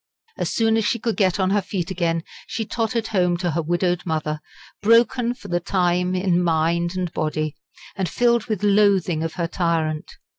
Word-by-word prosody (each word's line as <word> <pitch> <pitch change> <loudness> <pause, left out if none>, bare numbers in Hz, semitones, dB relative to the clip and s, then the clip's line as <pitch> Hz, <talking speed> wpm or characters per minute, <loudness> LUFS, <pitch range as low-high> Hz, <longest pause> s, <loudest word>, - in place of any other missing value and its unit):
As - - -2
soon 225 -1 +2
as 220 - +1
she 235 - +1
could 230 -1 -2
get 190 -2 +2
on 190 0 +2
her 205 0 +3
feet 190 -1 -4
again, 165 -3 0 0.2
she 225 - -3
tottered 225 0 -2
home 180 -4 +2
to 175 -1 -1
her 165 +2 0
widowed 175 +2 0
mother, 155 -2 -2 0.4
broken 235 +2 +3
for - - -12
the 175 0 0
time 180 0 +1
in 180 -1 +1
mind 170 +1 +1
and 180 -2 -2
body, 155 -1 -2 0.4
and 190 -3 -1
filled 235 -2 +2
with 215 -4 -2
loathing 195 -5 +3
of 165 0 -3
her 170 - -2
tyrant. 165 -3 -1
180 Hz, 185 wpm, -22 LUFS, 170-210 Hz, 0.4 s, her